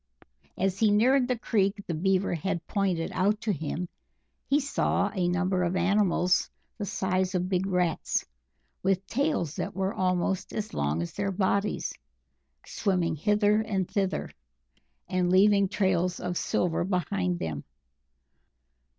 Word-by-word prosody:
As 190 0 0
he 220 - +4
neared 250 +5 +4
the 250 -1 0
creek 200 -3 0
the 170 - -3
Beaver 190 +4 +1
had 175 0 -2
pointed 190 -5 -1
out 205 +3 +1
to 215 - 0
him, 160 +2 -3 0.6
he 280 +2 +3
saw 275 -7 0
a 185 -4 0
number 180 +1 +1
of 180 +1 0
animals 185 -1 +2 0.3
the 205 - -3
size 185 -1 0
of 180 0 0
big 190 0 0
rats, 180 -3 0 0.6
with 190 0 +1
tails 255 - -1
that - - -3
were 195 +1 -1
almost 185 0 -1
as 215 0 -4
long 75 +3 0
as 85 - -7
their 200 0 -1
bodies, 200 +2 0 0.7
swimming 180 -6 0
hither 210 +5 +2
and 195 -4 -1
thither, 195 -2 -1 0.8
and 180 -1 0
leaving 200 +2 +5
trails 185 -3 +1
of 180 0 -3
silver 175 -1 0
behind 140 - -1
them. 80 -4 -4
190 Hz, 140 wpm, -28 LUFS, 175-205 Hz, 0.8 s, leaving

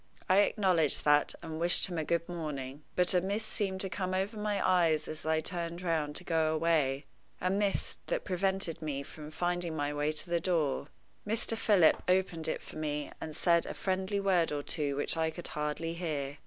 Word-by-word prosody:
I 185 - +4
acknowledged 185 -7 +3
that, 145 0 +4
and 160 -1 -5
wished 175 +1 +4
him 175 -4 -2
good 170 +1 0
morning. 150 -5 -5
But 180 0 +4
a 180 - +4
mist 200 +4 -2
seemed 190 -3 -2
to 195 - 0
come 185 0 -2
over 195 +4 -1
my 210 -1 -1
eyes 165 -4 +3
as 155 0 -6
I 160 0 +2
turned 170 +1 -2
round 155 -4 0
to - - 0
go 160 -2 +1
away 150 -4 +1 0.3
a 185 - 0
mist 200 0 0
that - - -2
prevented 190 -3 -1
me 140 -3 -3
from 150 +1 -10
finding 175 +1 -2
my 145 -1 -1
way 145 +1 0
to 155 +3 -2
the 170 0 +1
door. 160 -6 0 0.4
Mr. 225 +1 +2
Philip 200 -7 +4
opened 180 -3 +1
it - - -2
for - - -10
me, 150 -1 -3
and 155 -1 -5
said 170 0 +3
a - - -5
friendly 190 +1 -1
word 185 -5 +2
or 145 -1 -2
two 145 -3 -1
which 145 +3 -1
I 160 0 +1
could 170 +2 -7
hardly 150 +2 -3
hear. 150 -5 -3
170 Hz, 195 wpm, -31 LUFS, 155-185 Hz, 0.4 s, I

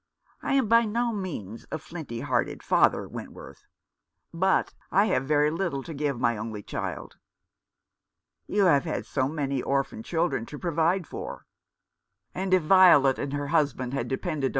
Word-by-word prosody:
I - - -1
am 265 -5 +2
by 230 +2 +5
no 235 +2 0
means 140 - -6
a - - -1
flinty 155 -8 -7
hearted 130 -4 -1
father, - - +3
Wentworth. - - -10 0.7
But 190 +3 +1 0.2
I 200 +2 +4
have 135 -11 0
very 150 0 +3
little 165 -5 -2
to 165 - -7
give 140 -3 -2
my 120 -2 +1
only 110 -1 -6
child." - - -5 1.3
"You 205 -1 +2
have 155 -3 +4
had 155 - -3
so 130 - 0
many 140 -3 -2
orphan 140 - -1
children 165 - -1
to 150 - -8
provide 170 +2 0
for." - - -7 0.4
" - - -54
And 190 0 -3
if 185 -3 +4
Violet 155 -6 +6
and 140 - -3
her 145 0 -3
husband 140 -5 0
had 140 - -2
depended 140 -1 -2
155 Hz, 160 wpm, -27 LUFS, 135-185 Hz, 1.3 s, Violet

